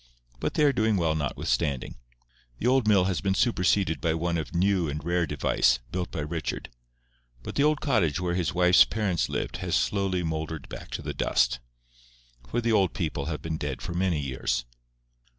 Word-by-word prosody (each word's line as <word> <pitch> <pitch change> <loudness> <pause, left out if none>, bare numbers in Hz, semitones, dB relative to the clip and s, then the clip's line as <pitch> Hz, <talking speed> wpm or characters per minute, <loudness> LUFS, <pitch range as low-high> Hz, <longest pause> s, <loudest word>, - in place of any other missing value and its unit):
But - - -2
they 150 - +3
are 145 -2 +5
doing 110 -3 +2
well 80 -3 +1
notwithstanding. 70 -2 -1 0.6
The - - -5
old 130 -2 +3
mill 100 -4 +5
has 95 -2 -1
been 95 0 0
superseded 95 -6 +2
by 80 -1 +1
one 85 +1 -1
of 80 +2 -6
new 90 -2 +2
and 75 0 -4
rare 85 0 0
device, 65 -3 +2
built 90 -1 -2
by 80 - -4
Richard; 80 -2 -4 0.7
but - - -6
the - - +1
old 150 +1 +3
cottage 95 - +1
where 90 -1 -1
his 85 -3 0
wife's 90 0 +6
parents 100 -6 -1
lived - - -3
has - - -1
slowly 90 +9 0
mouldered 80 -2 -4
back - - -8
to - - -4
the - - -4
dust. 60 0 +1 0.9
For 120 - 0
the 115 0 +1
old 100 -4 +2
people 75 -5 -2
have 80 -2 -4
been 80 -1 -3
dead 70 -5 -4
for 85 - -4
many 90 -3 +1
years. 65 -3 -2
85 Hz, 185 wpm, -27 LUFS, 75-95 Hz, 0.9 s, wife's